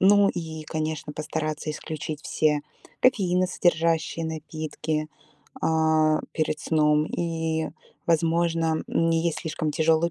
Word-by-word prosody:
Ну 200 +1 +6
и, 160 -2 -5
конечно, 155 -1 -3
постараться 155 0 -3
исключить 155 0 -5
все 150 -1 +1 0.4
кофеиносодержащие 175 -6 +2
напитки, 155 -1 -3 0.5
э, 160 -1 +3
перед 155 -1 0
сном 150 -1 +3
и, 160 -2 -1 0.4
возможно, 165 -1 +2
м, 165 0 +2
не 165 0 +2
есть 165 - 0
слишком 160 -1 -2
тяжелую 160 +2 +3
160 Hz, 105 wpm, -26 LUFS, 155-165 Hz, 0.5 s, Ну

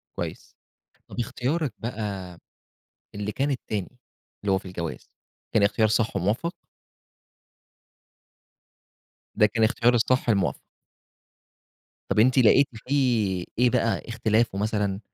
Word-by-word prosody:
كويس. - - -6 0.5
طَب - - -8
اختيارِك 135 +5 -1
بقى 100 -6 -5 0.8
اللي 105 +1 -3
كان 140 +4 0
التاني، 110 -3 -4 0.5
اللي 100 - +1
هو 95 - +4
في 95 - -9
الجواز، 85 -3 -6 0.4
كان 105 - +4
اختيار 110 +2 +3
صح 110 -1 +1
وموفّق؟ 105 - 0 2.8
ده 105 - +5
كان 110 +1 +1
إختيار 120 +2 +3
الصح 125 +1 +2
الموفّق. 100 -4 +1 1.5
طَب - - +2
أنتِ 130 +4 +4
لقيتِ 130 +3 +6 0.2
فيه 115 -10 +1
إيه 125 0 +5
بقى، 115 -2 +1
إختلافه 115 -2 +1
مثلًا 105 -1 -1
110 Hz, 110 wpm, -25 LUFS, 100-125 Hz, 2.8 s, لقيتِ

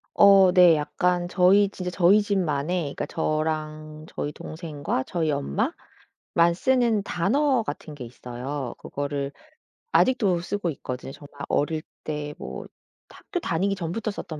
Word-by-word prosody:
어 195 -2 +7
네. 180 -3 +7
약간 175 +4 0
저희 190 +3 +4
진짜 180 -2 -5
저희 185 +4 +5
집만의 175 -4 0
그니까 140 - -4
저랑 155 0 -3
저희 145 - -4
동생과 150 -4 -4
저희 165 -3 0
엄마만 170 - -1
쓰는 240 -1 +2
단어 255 - +1
같은 150 -1 -6
게 125 - -7
있어요. 125 +2 -6
그거를 140 -1 -4 0.6
아직도 210 - +3
쓰고 185 0 -2
있거든요. 130 -2 -6
정말 145 0 -13
어릴 155 +2 0 0.2
때 150 -1 -4
뭐 - - -7 0.4
학교 360 - -6
다니기 195 - 0
전부터 195 +5 -3
썼던 160 -6 -7
170 Hz, 275 characters per minute, -25 LUFS, 145-195 Hz, 0.6 s, 어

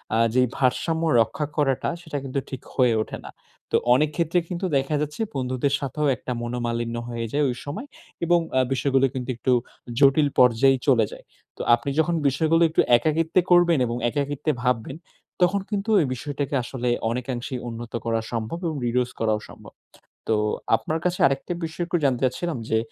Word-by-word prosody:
আ - - +3 0.2
যে 130 - +5 0.2
ভারসাম্য 160 +5 +1 0.2
রক্ষা 115 +7 -1
করাটা, 135 -3 +1
সেটা 160 -4 -5
কিন্তু 135 0 -2
ঠিক 130 - -6
হয়ে 125 -3 +4
ওঠে - - -7
না। - - -8 0.4
তো - - +2 0.2
অনেক 150 +3 +2
ক্ষেত্রে 170 +2 +1
কিন্তু 180 +1 -3
দেখা 135 +3 0
যাচ্ছে, 150 +8 -4
বন্ধুদের 130 +1 -1
সাথেও 145 +2 -2
একটা 125 - -7
মনোমালিন্য 120 -1 -2
হয়ে 115 -1 -3
যায় 145 0 +2
ওই 125 - -2
সময়। 145 - -5 0.4
এবং 175 0 +4 0.2
আ - - +5
বিষয়গুলো 135 0 +2
কিন্তু 130 -2 -5
একটু 130 +2 +1 0.5
জটিল 140 +1 +5
পর্যায়ে 125 +2 +5
চলে 120 -5 +5
যায়। - - -11 0.3
তো - - -5
আপনি 120 +4 -5
যখন 170 +2 +2
বিষয়গুলো 160 +5 +2
একটু 155 - +3 0.2
একাকিত্বে 160 +6 +1
করবেন 175 -2 +5
এবং 120 +1 -3
একাকিত্বে 145 +2 -1
ভাববেন, 125 +1 0 0.5
তখন 185 +3 +3
কিন্তু 205 0 -2
এই 150 - 0
বিষয়টাকে 140 +2 -3
আসলে 125 0 -3 0.2
অনেকাংশেই 125 +1 -4
উন্নত 115 0 -8
করা 115 -1 +1
সম্ভব 115 +6 -3
এবং 160 - -2
reduce 125 +1 0
করাও 110 -1 +1
সম্ভব। - - -13 0.6
তো 110 - +3 0.4
আপনার 160 - -3
কাছে 180 0 0
আরেকটা 135 +5 -1
বিষয় 165 +2 -3
একটু 175 0 0
জানতে 130 -3 +2
চাচ্ছিলাম 140 +4 -1
যে, 110 - +3
135 Hz, 175 wpm, -24 LUFS, 125-160 Hz, 0.6 s, যে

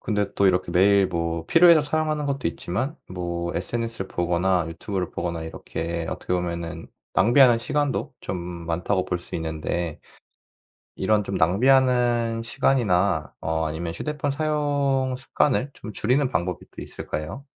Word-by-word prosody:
근데 105 -2 -1
또 100 - +4
이렇게 90 -1 +1
매일 95 +2 +5
뭐 85 -2 -2
필요해서 170 -2 +7
사용하는 155 0 -1
것도 140 -5 -1
있지만 120 - -3
뭐 85 -1 -3
SNS를 115 +2 -3
보거나 90 0 +1
유튜브를 90 +2 -4
보거나 85 -2 -3
이렇게 85 +1 -4
어떻게 90 - -3
보면은 85 -1 -3 0.3
낭비하는 120 0 +6
시간도 145 +4 -1
좀 90 - -4
많다고 85 +2 -2
볼 90 - -1
수 - - -8
있는데 80 0 -3 1.0
이런 105 +2 +2
좀 95 - -3
낭비하는 120 +4 +3
시간이나 100 - +1
어 80 0 -1
아니면 85 +2 -4
휴대폰 145 - -2
사용 140 -3 0
습관을 135 +1 0
좀 110 - -9
줄이는 125 +6 +1
방법이 85 -1 -2
또 - - -9
있을까요? 90 - -6
95 Hz, 330 characters per minute, -24 LUFS, 85-130 Hz, 1.0 s, 필요해서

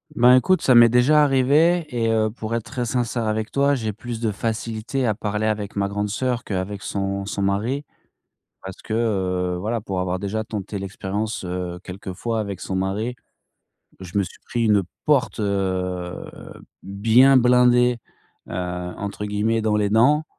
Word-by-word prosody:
Ben, 125 0 +6
écoute, 185 +9 +3
ça 130 - +4
m'est 120 0 +8
déjà 130 +6 +5
arrivé 150 +5 +3
et 115 -4 -1
heu, 110 -1 +2
pour 110 0 -6
être 115 -2 -2
très 125 +3 -4
sincère 120 -1 -1
avec 110 0 -2
toi. 140 +1 +2
J'ai 110 -5 -3
plus 115 +2 -6
de 115 -2 0
facilité 115 +4 -3
à 110 - +2
parler 105 0 -2
avec 105 -2 -3
ma 100 0 +1
grande 105 +1 -2
sœur 125 +3 -1
qu'avec 100 +1 -4
son 100 0 -3
son 100 0 -4
mari 110 +9 -1 0.8
parce 95 -1 -8
que, 110 - -5
heu, 95 -5 0
voilà, 110 +4 -2
pour 95 -3 -3
avoir 90 0 -1
déjà 105 +3 -3
tenté 105 -1 -5
l'expérience, 100 +2 -4
heu, 90 -1 -4
quelquefois, 100 +4 -4
avec 100 -3 -5
son 95 - -3
mari, 100 +6 -2 0.9
je 95 +2 -4
me 100 - +2
suis 90 - -11
pris 120 -1 -1
une 105 -3 +4 0.2
«porte, 145 -6 +2
heu, 95 -3 -2 0.6
bien 115 +7 +4
blindée», 125 0 +4 0.5
heu, - - -8
entre 90 +4 -4
guillemets, 105 +2 0
dans 110 -1 +1
les 105 -1 +1
dents, 145 +8 +4
110 Hz, 170 wpm, -22 LUFS, 100-120 Hz, 0.9 s, m'est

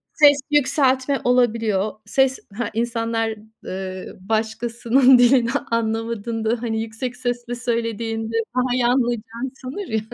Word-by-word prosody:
Ses 290 -2 +6
yükseltme 270 -1 +2
olabiliyor. 225 -5 +2
Ses 265 -1 +2 0.2
Ha, 235 +3 -3
insanlar, 230 -1 -1 0.3
ııı, 185 0 -6
başkasının 230 +4 +3
dilini 245 -1 +4 0.2
anlamadığında, 225 0 -1
hani, 225 -2 -1
yüksek 235 +3 -5
sesle 245 -1 -3
söylediğinde 230 -2 -2 0.2
daha 250 -1 +1
iyi 250 -1 +2
anlayacağını 240 0 -1
sanır 275 +10 -7
ya. 220 - 0
235 Hz, 110 wpm, -22 LUFS, 225-255 Hz, 0.3 s, Ses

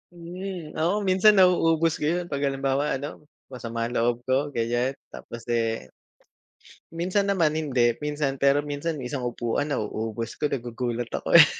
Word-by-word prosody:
Hmm, 175 -1 -7
oo 190 +6 +1
minsan 190 +3 +5
nauubos 165 -3 +4
ko 150 - -1
yun 175 +1 -1
pag 140 - -1
halimbawa 135 +1 0
ano 145 +2 -8 0.3
masama 115 -2 -4
ang 120 - -4
loob 120 +1 +1
ko 130 +4 +1
ganyan 120 +3 0 0.2
tapos, 120 0 -9
eh 115 - -1 1.0
Minsan 185 +4 0
naman 170 -6 +3
hindi. 130 -7 +2
Minsan 145 -2 -2
pero 140 +1 +4
minsan 145 +3 -3
isang 130 +2 -3
upuan 120 +4 -2
nauubos 110 -3 -3
ko 150 - +2
nagugulat 120 -2 -3
ako - - +3
eh. - - +11
140 Hz, 150 wpm, -26 LUFS, 120-165 Hz, 1.0 s, eh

